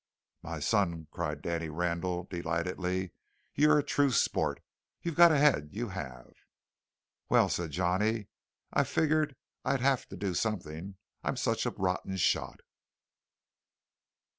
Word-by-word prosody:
"My 80 -1 -5
son," 85 -2 +1
cried 75 -1 -3
Danny 85 -1 -2
Randall 90 +2 -1
delightedly, 90 +1 -2 0.4
"you're 150 +1 +5
a 145 - +2
true 145 0 +2
sport. 125 - +1 0.4
You've 170 - -2
got 170 +2 +8
a 155 - +4
head, 140 - +4
you 115 +2 -3
have!" 65 -10 -7 1.0
"Well," - - +5
said 85 -2 -1
Johnny, 95 +6 0 0.5
"I - - +4
figured 155 -2 +1 0.3
I'd 135 - +1
have 135 -1 +2
to - - -9
do 100 -3 -2
something; 95 -3 -3 0.3
I'm - - -1
such - - 0
a - - +2
rotten 95 0 -2
shot." 80 - 0
95 Hz, 130 wpm, -31 LUFS, 85-120 Hz, 1.0 s, got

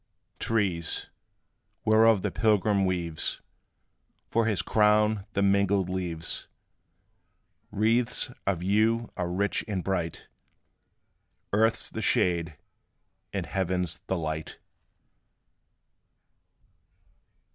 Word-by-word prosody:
Trees, 95 -7 -1 0.7
whereof 110 -2 +4
the - - -1
pilgrim 105 -3 +2
weaves 85 -4 -1 0.9
For 115 -1 +2
his 100 -6 0
crown 105 -1 +2
the 100 - +1
mingled 100 -1 +2
leaves, 85 -3 -3 1.2
Wreaths 115 +5 +1 0.2
of 90 -3 0
you 110 +4 +1
are 90 -1 -3
rich 100 +3 -1
and 95 -4 -3
bright; 90 -4 -3 1.3
Earth 110 +2 +3
's - - +7
the - - -5
shade, 85 -3 +1 0.7
and - - -3
heaven 90 -1 -1
's 85 +1 -6
the 95 - -1
light. 80 -1 -4
100 Hz, 90 wpm, -27 LUFS, 90-110 Hz, 1.3 s, s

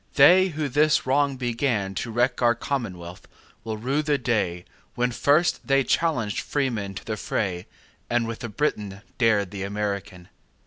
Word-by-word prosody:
They 180 +6 +7
who 155 -4 -3
this 150 +3 +2
wrong 140 +1 +1
beganTo 115 -4 -1
wreck 125 +3 +1
our 120 -1 +4
commonwealth, 95 -10 -5 0.4
will 110 -1 -4
rue 135 +7 0
the 150 -1 +1
dayWhen 115 +1 -2
first 150 +8 +2
they 135 -1 +3
challenged 125 - 0
freemen 115 -9 -2
to - - -8
the 110 -1 -3
fray, 95 -4 -2 0.4
And 120 -1 +1
with 115 -1 -5
the 120 - -5
Briton 105 -5 -2 0.2
dared 105 -5 +2
the 100 -2 -6
American. 100 -3 -4
120 Hz, 145 wpm, -25 LUFS, 100-140 Hz, 0.4 s, They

